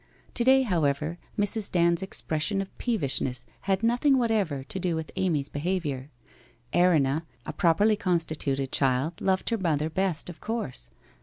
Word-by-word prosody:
To 240 - 0
day, 265 +1 +5
however, 160 - 0 0.2
Mrs. 205 0 +1
Dand's 170 -1 +3
expression 190 0 0
of 195 -1 -5
peevishness 135 - +1 0.2
had 195 +2 +1
nothing 245 +4 +3
whatever 205 - 0
to 190 - -5
do 180 -2 0
with 160 -1 -5
Amy's 155 -7 0
behaviour. 145 -4 -3 0.6
Erinna, 160 -3 +3 0.2
a - - -5
properly 205 +6 +3
constituted 155 -8 -1
child, 135 +4 0
loved 190 +2 0
her 230 - 0
mother 160 -3 0
best, 185 -3 -1
of 175 -2 -10
course. 180 - -3
170 Hz, 145 wpm, -27 LUFS, 145-200 Hz, 0.6 s, day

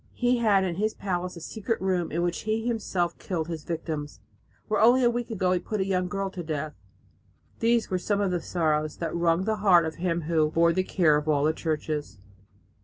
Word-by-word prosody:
He 245 0 +2
had 205 -4 +4
in 175 -2 -2
his 215 +2 0
palace 180 -2 -3
a - - -9
secret 220 +6 -3
room 185 -3 0
in 170 +2 -1
which 175 0 -1
he 220 +1 -2
himself 205 -7 -1
killed 165 -4 -3
his 160 -3 -5
victims, 155 -3 -4 0.5
where 215 -1 +1
only 245 +3 +6
a 240 - +4
week 240 0 -3
ago 185 -5 0
he 180 - +2
put 215 +4 -4
a 190 - +1
young 185 -2 0
girl 195 +1 -3
to 185 - -6
death!" 155 -2 -4 0.9
These 230 -1 +2
were 185 - +1
some 205 +3 0
of 200 -2 +1
the 175 -2 -1
sorrows 155 -3 0
that 165 - -3
wrung 170 +1 +2
the 215 +1 0
heart 185 -5 +5
of 160 - -5
him 170 -1 -1
"who 155 -1 +1
bore 170 +1 +3
the 185 - +2
care 170 -5 +3
of 150 +1 -4
all 145 -2 +2
the 155 +1 +3
churches." 155 -5 -3
180 Hz, 220 wpm, -27 LUFS, 165-205 Hz, 0.9 s, only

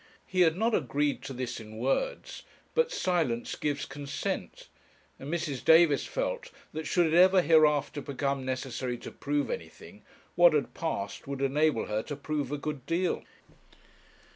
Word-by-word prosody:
He 185 -1 0
had 165 -1 +4
not 225 +3 +1
agreed 145 - 0
to 135 - -5
this 125 -1 -4
in 110 0 -10
words; 135 - -2 0.3
but 480 0 +2
silence 165 - 0
gives 145 -2 -2
consent, 140 +1 -5 0.5
and 140 +3 -6
Mrs. 160 -6 -2
Davis 160 -3 +5
felt - - -3 0.2
that 155 -1 -4
should 175 -1 +3
it 160 - 0
ever 185 +1 +6
hereafter 150 -2 +3
become 140 0 -2
necessary 130 -1 -3
to - - -9
prove 145 0 -1
anything, - - -8 0.3
what 175 -2 +6
had 145 - 0
passed 135 -12 -4
would 140 0 -3
enable 145 -1 +2
her 105 0 -1
to 145 - -6
prove 145 -1 -3
a 145 - -1
good 145 -2 -5
deal. 175 +1 0
145 Hz, 155 wpm, -29 LUFS, 135-170 Hz, 0.5 s, ever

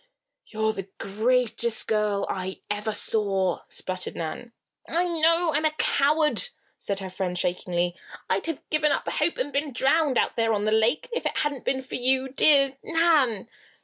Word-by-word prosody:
"You're 220 0 -1
the 195 -2 -7
greatest 235 +2 +1
girl 210 -2 0
I 190 0 -4
ever 210 +1 -2
saw!" 195 -4 0
sputtered 185 0 -5
Nan. 165 +8 -5 0.4
"I 340 +2 +1
know 330 0 +2
I'm 300 +2 +2
a 310 0 +2
coward," 300 +1 +2 0.3
said 200 -1 -3
her 190 - -5
friend, 180 -1 -3
shakingly. 175 0 -1 0.3
"I'd 195 +11 -1
have 325 -4 -5
given 305 -1 +3
up - - -1
all - - -1
hope 320 +3 0
and 285 +3 -3
been 285 +1 -1
drowned, 275 +2 +2
out - - +1
there 225 -1 +1
on 205 0 0
the 215 - +1
lake, 225 - +2
if 480 - -1
it - - -3
hadn't 295 -4 -2
been 265 0 -1
for 260 - -12
you, 260 +1 +2
dear 275 0 +4
Nan." 310 - +2
245 Hz, 175 wpm, -25 LUFS, 200-300 Hz, 0.4 s, dear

